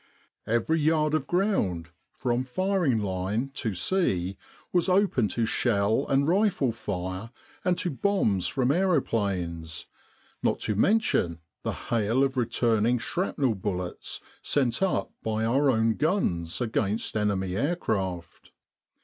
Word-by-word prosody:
Every 120 +9 +1
yard 155 0 +2
of 155 - 0
ground, 100 - 0 0.2
from 125 0 -1
firing 175 - +1
line 100 +5 -2
to 110 -6 -3
sea, 95 - 0 0.4
was 175 +1 +2
open 185 - +3
to 115 +4 0
shell 110 +2 +1
and 140 +1 +3
rifle 185 - +2
fire 95 -1 -4 0.3
and 180 -1 +2
to 175 - -1
bombs 130 - +1
from 130 -1 +1
aeroplanes, 100 - 0 0.6
not - - +1
to 105 - 0
mention 105 - +2 0.2
the - - -2 0.2
hail 115 +3 +2
of 135 -1 0
returning 115 -1 +2
shrapnel 135 -1 -1
bullets 90 -3 -4 0.2
sent 130 -2 +1
up 190 -1 0
by 110 0 -1
our 135 +5 +3
own 115 -2 +3
guns 90 - 0
against 110 -3 -1
enemy 95 -3 0
aircraft. 100 - -2
115 Hz, 125 wpm, -27 LUFS, 100-155 Hz, 0.6 s, open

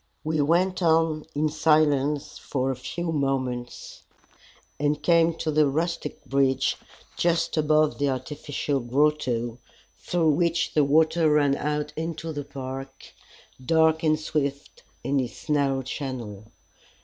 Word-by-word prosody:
We 155 -1 0
went 180 +6 +1
on 160 -2 +2
in 155 +2 +1
silence 150 -2 +1
for 135 -1 -2
a - - -3
few 170 +6 -4
moments, 130 -4 -3 0.8
and 145 +1 +1
came 165 -1 +4
to 160 -1 -2
the 150 0 +4
rustic 160 0 -3
bridge 135 0 +1 0.4
just 170 -1 +1
above 155 -1 +2
the 145 0 +1
artificial 140 +2 -3
grotto 125 -3 0 0.4
through 170 -3 +1
which 170 +2 0
the 150 - +4
water 160 +3 +3
ran 145 -2 +3
out 150 +1 -2
into 160 0 -4
the 145 -1 -4
park, 135 0 -8 0.5
dark 160 +2 +3
and 155 -2 +2
swift 140 -2 -3 0.2
in 135 +3 +1
its 125 +4 -5
narrow 140 -2 +1
channel. 120 -6 -6
150 Hz, 125 wpm, -25 LUFS, 135-160 Hz, 0.8 s, came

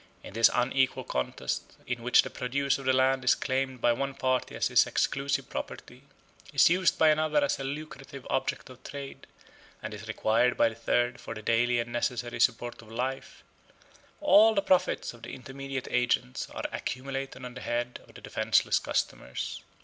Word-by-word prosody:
In - - -10
this 115 +1 +6
unequal 130 +1 +1
contest, 65 - -3
in 125 -1 -3
which 125 +1 +5
the - - -7
produce 140 +2 0
of 135 - -9
the 130 - +4
land 130 0 +3
is 125 - +5
claimed 130 -2 -2
by 120 - +4
one 135 +2 -3
party 130 -1 0
as - - 0
his - - +5
exclusive 140 +1 0
property, 125 +1 -7 0.5
is 140 +3 +5
used 185 0 +3
by 160 - +5
another 155 - +2
as 285 - 0
a - - -4
lucrative 140 -1 -7
object 130 - -2
of 125 - -15
trade, 140 -1 -8 0.5
and 105 +1 -6
is 105 +1 -9
required 115 +3 +2
by 115 - +4
a - - -9
third 120 +2 0
for 115 - -7
the 110 - -8
daily 120 +2 +2
and 120 0 -2
necessary 120 0 -2
support 120 +1 +1
of 110 -1 -15
life, 130 +3 -4 0.8
all 220 -7 +6
the 200 - +2
profits 185 -8 +1
of 120 - -15
the - - -7
intermediate 135 +1 -6
agents 125 +1 0
are - - -6
accumulated 135 0 -4
on 125 - -7
the 125 - -9
head 120 +1 -2
of - - -19
the - - -11
defenceless - - +2
customers. 65 - -3
130 Hz, 180 wpm, -29 LUFS, 120-135 Hz, 0.8 s, this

